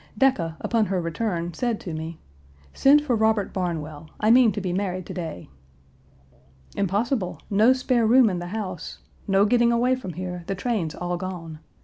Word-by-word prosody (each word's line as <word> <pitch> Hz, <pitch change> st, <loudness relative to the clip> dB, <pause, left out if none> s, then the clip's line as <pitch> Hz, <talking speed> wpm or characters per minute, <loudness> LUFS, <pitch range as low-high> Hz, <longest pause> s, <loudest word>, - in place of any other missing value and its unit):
Decca, 185 Hz, -12 st, +2 dB
upon 225 Hz, -3 st, +1 dB
her 190 Hz, -1 st, 0 dB
return, 170 Hz, 0 st, -2 dB
said 240 Hz, 0 st, -1 dB
to 170 Hz, -, -6 dB
me: 160 Hz, +1 st, -5 dB, 0.6 s
'Send 290 Hz, +2 st, +5 dB
for 260 Hz, -5 st, +1 dB
Robert 220 Hz, -2 st, +1 dB
Barnwell. 160 Hz, -5 st, -4 dB
I 215 Hz, +1 st, +3 dB
mean 240 Hz, -2 st, +6 dB
to 205 Hz, -, -3 dB
be 185 Hz, -2 st, -3 dB
married 185 Hz, -1 st, -2 dB
to -, -, -7 dB
day.' 165 Hz, -, -6 dB, 0.7 s
" 65 Hz, 0 st, -29 dB
'Impossible. 200 Hz, +1 st, -1 dB
No 215 Hz, +5 st, +5 dB
spare 255 Hz, -3 st, +2 dB
room 250 Hz, +1 st, +6 dB
in 185 Hz, -4 st, -1 dB
the 175 Hz, -, -6 dB
house. 185 Hz, -4 st, -5 dB, 0.3 s
No 195 Hz, 0 st, +4 dB
getting 235 Hz, +1 st, +3 dB
away 245 Hz, +2 st, +2 dB
from 250 Hz, -9 st, -4 dB
here; 180 Hz, 0 st, -5 dB
the 195 Hz, -, -2 dB
trains 200 Hz, -6 st, -2 dB
all 175 Hz, 0 st, -3 dB
gone. 175 Hz, -4 st, -6 dB
190 Hz, 175 wpm, -24 LUFS, 170-230 Hz, 0.7 s, mean